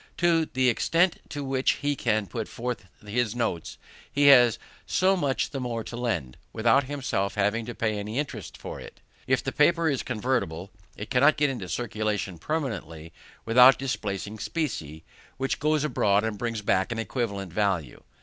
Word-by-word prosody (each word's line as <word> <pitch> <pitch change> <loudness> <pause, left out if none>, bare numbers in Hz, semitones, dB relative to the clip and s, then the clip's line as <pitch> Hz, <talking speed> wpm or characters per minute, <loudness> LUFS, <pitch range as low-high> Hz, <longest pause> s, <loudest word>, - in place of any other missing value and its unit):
To 165 -2 +3
the 130 0 +2
extent 170 +8 +2
to 145 -1 -5
which 135 -1 +1
he 145 0 -1
can 110 -5 0
put 110 +2 -5
forth 120 -4 -5 0.2
his 115 +1 -1
notes, 115 -9 -2 0.3
he 145 0 +2
has 120 -5 +7 0.3
so 190 +1 +3
much 140 -7 -1
the 135 - -4
more 120 -3 -3
to 115 - -8
lend, 100 - -2 0.2
without 120 +5 +3
himself 130 -8 -2
having 105 +3 0
to 120 - -6
pay 110 -2 -1
any 105 +4 -5
interest 145 0 -4
for - - -7
it. - - -12 0.3
If 130 -1 +2
the 135 - -2
paper 165 +3 +3
is 140 -4 +1
convertible, 105 -7 -2 0.3
it 105 - -7
cannot 140 +5 +5
get 145 -2 +2
into 100 -9 -6
circulation 105 -6 -2
permanently 85 - -4 0.3
without 125 +3 +7
displacing 105 -5 -4
specie, 95 - -4 0.3
which 135 0 -1
goes 150 0 +1
abroad 105 -8 +2
and 110 -1 -2
brings 115 0 -3
back 95 +1 +1
an 115 - -3
equivalent 100 -6 -3
value. 95 - -1
120 Hz, 170 wpm, -26 LUFS, 105-135 Hz, 0.3 s, has